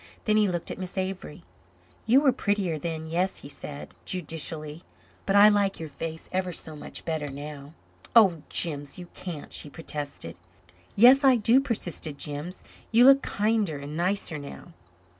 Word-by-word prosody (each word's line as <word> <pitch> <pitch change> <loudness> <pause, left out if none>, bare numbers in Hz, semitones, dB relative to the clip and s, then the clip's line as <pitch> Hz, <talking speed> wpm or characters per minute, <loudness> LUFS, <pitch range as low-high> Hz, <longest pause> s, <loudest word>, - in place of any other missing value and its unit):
Then 215 - +3
he 215 -1 +4
looked 175 -3 -3
at - - -7
Miss 185 +1 -7
Avery. 185 -5 -4 0.6
"You 255 +5 +6
were 280 -3 +5
prettier 200 -9 -1
then 160 0 -4
yes," 175 +4 -1
he 140 - -10
said, 145 0 -8
judicially, 160 -2 -3 0.5
"but 195 - +2
I 205 +1 +9
like 205 -2 +2
your 160 -1 -6
face 160 +1 -6
ever 185 0 -1
so 160 -2 -5
much 150 - -8
better 155 -3 -2
now." 145 +1 -8 0.4
"Oh, 190 -9 +6
Jims, 145 -4 -3
you 175 -1 -9
can't," 170 -5 -7
she 150 - -4
protested. 145 - -6 0.6
"Yes, 255 +6 +7
I 265 -2 +7
do," 235 +3 +4
persisted 175 - -4
Jims. 150 +5 -5 0.3
"You 235 +2 +6
look 275 +1 +8
kinder 210 - 0
and 140 +2 -7
nicer 175 -2 +2
now." 140 -10 -10
175 Hz, 160 wpm, -27 LUFS, 150-205 Hz, 0.6 s, I